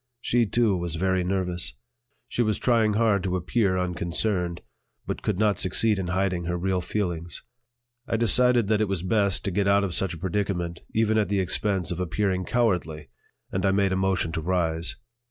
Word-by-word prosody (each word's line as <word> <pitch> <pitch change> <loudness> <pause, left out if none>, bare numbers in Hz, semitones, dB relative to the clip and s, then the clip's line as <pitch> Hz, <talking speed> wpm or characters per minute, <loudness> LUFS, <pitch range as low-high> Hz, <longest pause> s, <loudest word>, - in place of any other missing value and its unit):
She, 120 -1 +1
too, 110 -1 +2
was 85 -2 -3
very 95 +1 +1
nervous; 90 -3 -1 0.5
she - - -1
was 110 -3 +1
trying 115 -3 +2
hard 105 -2 +2
to 90 0 -1
appear 95 +1 +1
unconcerned, 90 0 -1 0.4
but - - -4
could 105 - -1
not 105 -1 +2
succeed 105 +2 +1
in 90 - -3
hiding 90 -1 -1
her 90 +1 -1
real 95 +1 0
feelings. 85 -5 -3 0.6
I 115 - 0
decided 120 0 +3
that 110 -1 +2
it 110 - +2
was 95 -3 -2
best 100 0 +2
to 100 - -1
get 100 +2 0
out 100 0 +4
of 95 -3 -2
such 90 0 0
a - - -9
predicament 90 -1 -2
even 110 0 +2
at 105 -4 0
the 100 -1 +1
expense 95 -1 0
of 85 - -3
appearing 95 +1 -1
cowardly, 85 - 0 0.4
and 95 - -2
I 100 - +3
made 95 0 +2
a - - +1
motion 95 -3 0
to 80 - -3
rise. 85 -1 0
95 Hz, 190 wpm, -25 LUFS, 90-105 Hz, 0.6 s, out